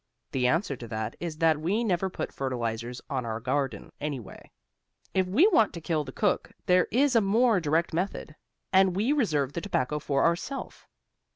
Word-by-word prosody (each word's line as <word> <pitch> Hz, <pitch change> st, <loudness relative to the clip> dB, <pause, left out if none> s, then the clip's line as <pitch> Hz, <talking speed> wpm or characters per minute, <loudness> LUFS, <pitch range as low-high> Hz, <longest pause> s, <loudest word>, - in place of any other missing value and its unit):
The 125 Hz, -2 st, +1 dB
answer 155 Hz, +1 st, +1 dB
to 120 Hz, -, -8 dB
that 110 Hz, 0 st, -4 dB
is 165 Hz, -3 st, -4 dB
that 160 Hz, -2 st, +3 dB
we 200 Hz, +9 st, 0 dB
never 190 Hz, -3 st, 0 dB
put -, -, -5 dB
fertilizers 120 Hz, -2 st, -3 dB
on 130 Hz, -2 st, -2 dB
our 110 Hz, -1 st, -3 dB
garden, 135 Hz, +3 st, -2 dB
anyway. 140 Hz, -7 st, -6 dB, 0.6 s
If 190 Hz, -1 st, +2 dB
we 230 Hz, -, +4 dB
want 225 Hz, -, +3 dB
to 170 Hz, -, -6 dB
kill 160 Hz, -2 st, -1 dB
the 130 Hz, -, -7 dB
cook 205 Hz, +7 st, 0 dB
there 180 Hz, 0 st, +4 dB
is 265 Hz, +2 st, +2 dB
a 230 Hz, -, +6 dB
more 220 Hz, +1 st, +3 dB
direct 160 Hz, +1 st, 0 dB
method, 170 Hz, -3 st, -3 dB, 0.4 s
and 190 Hz, -1 st, +5 dB
we 220 Hz, +9 st, +2 dB
reserve 150 Hz, -, +1 dB
the 170 Hz, -, -3 dB
tobacco 150 Hz, -7 st, -1 dB
for 140 Hz, -1 st, +1 dB
ourself. 170 Hz, +11 st, -2 dB
165 Hz, 180 wpm, -28 LUFS, 135-195 Hz, 0.6 s, a